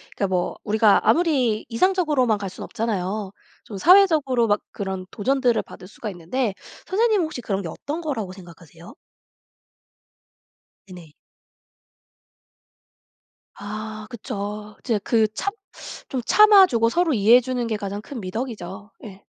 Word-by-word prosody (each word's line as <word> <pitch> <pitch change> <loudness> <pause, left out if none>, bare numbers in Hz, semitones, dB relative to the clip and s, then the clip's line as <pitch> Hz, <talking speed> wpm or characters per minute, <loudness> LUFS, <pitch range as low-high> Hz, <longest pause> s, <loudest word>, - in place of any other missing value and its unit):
그니까 200 - 0
뭐 180 -2 -2
우리가 215 0 +4
아무리 270 -10 +2
이상적으로만 295 - +2
갈 200 -1 -5
순 185 - -10
없잖아요. 205 -2 -3 0.3
좀 205 - -8
사회적으로 310 - +4
막 205 -1 +1
그런 190 -2 -5
도전들을 245 0 +1
받을 180 - -13
수가 215 +2 -7
있는데 200 +6 -2 0.3
선생님은 425 -1 +2
혹시 310 -5 -6
그런 200 -4 -2
게 180 - -6
어떤 290 - -5
거라고 240 - -4
생각하세요? 170 -2 -14 2.0
네네. 175 -4 -12 2.4
아. 215 +1 -7
그쵸. 210 -1 -6
진짜 225 -4 0
그 225 -2 +3
참 400 - -3 0.6
좀 260 - -2
참아 420 -2 +7
주고 230 -8 +1
서로 335 +3 +1
이해해 225 +2 +6
주는 250 -1 -3
게 220 -2 -2
가장 200 0 -5
큰 265 +3 -8
미덕이죠. 205 -1 -6
예. 200 -3 -11
220 Hz, 280 characters per minute, -23 LUFS, 200-265 Hz, 2.4 s, 참아